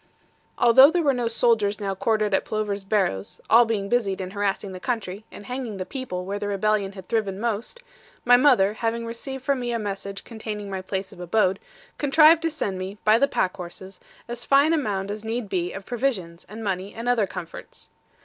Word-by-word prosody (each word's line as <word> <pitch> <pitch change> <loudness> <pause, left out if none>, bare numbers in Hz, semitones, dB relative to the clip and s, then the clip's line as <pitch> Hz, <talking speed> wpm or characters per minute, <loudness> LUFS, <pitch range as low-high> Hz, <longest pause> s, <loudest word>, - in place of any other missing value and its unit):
Although 255 +4 +8
there 345 +1 +1
were 280 -2 +3
no 245 -2 -1
soldiers 225 -3 +2
now 200 -2 -2
quartered 215 +1 0
at - - +2
Plover's 210 -2 -3
Barrows, 190 - -1
all 235 +2 +8
being 210 -3 -2
busied 200 -4 0
in 185 -1 -5
harassing 200 -1 -2
the 185 - -7
country, 215 -2 -4
and 205 - -11
hanging 250 -4 -5
the 185 - -4
people 185 -10 -5
where 200 +2 -3
the 205 - -3
rebellion 200 0 0
had 190 -2 -11
thriven 200 -4 -1
most, 235 - -3 0.4
my 245 0 +7
mother, 245 -7 +4
having 230 +1 -2
received 255 +3 -6
from 280 -2 +1
me 240 -1 -2
a 235 - 0
message 200 -2 -5
containing 215 -3 -6
my 190 -1 -3
place 190 0 -4
of - - -15
abode, 190 +2 +1 0.4
contrived 310 +3 +6
to 330 - 0
send 205 - -3
me, 190 +2 -6
by 215 +2 +5
the 280 - +4
pack 185 -8 0
horses, 185 +1 -9 0.3
as 240 0 -5
fine 280 +4 +4
a - - +3
maund 200 -6 -2
as 210 +1 -6
need 225 0 -3
be 180 -1 -1
of 195 0 -8
provisions, 215 -10 -3
and 220 +2 -8
money, 195 -1 -3
and 230 +1 -5
other 235 -5 +2
comforts. 165 -2 -9
215 Hz, 205 wpm, -24 LUFS, 195-240 Hz, 0.4 s, Although